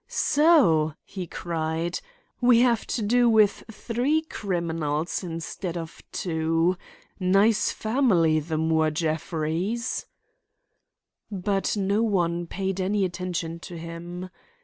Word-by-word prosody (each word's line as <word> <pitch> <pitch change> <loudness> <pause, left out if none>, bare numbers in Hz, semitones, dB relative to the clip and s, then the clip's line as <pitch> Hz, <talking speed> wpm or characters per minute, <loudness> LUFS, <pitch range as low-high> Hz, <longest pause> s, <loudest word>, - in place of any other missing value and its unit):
"So!" 185 - +4
he 185 -3 -6
cried, 165 0 -3 0.4
"we 240 -1 +6
have 240 -3 +2
to 225 - -2
do 240 +3 +4
with 215 -2 +4
three 250 +8 0
criminals 165 - -2
instead 170 +1 -5
of 165 -1 -7
two. 165 +1 0 0.4
Nice 195 +4 +3
family, 210 - +2
the 155 +1 -3
Moore 160 0 +2
Jeffreys!" 160 +7 -2 1.2
But 195 +1 -1
no 200 +2 +1
one 175 -6 0
paid 190 +1 -2
any 195 +1 +1
attention 175 -2 -4
to 175 0 -9
him. 170 +2 -7
180 Hz, 105 wpm, -25 LUFS, 165-210 Hz, 1.2 s, we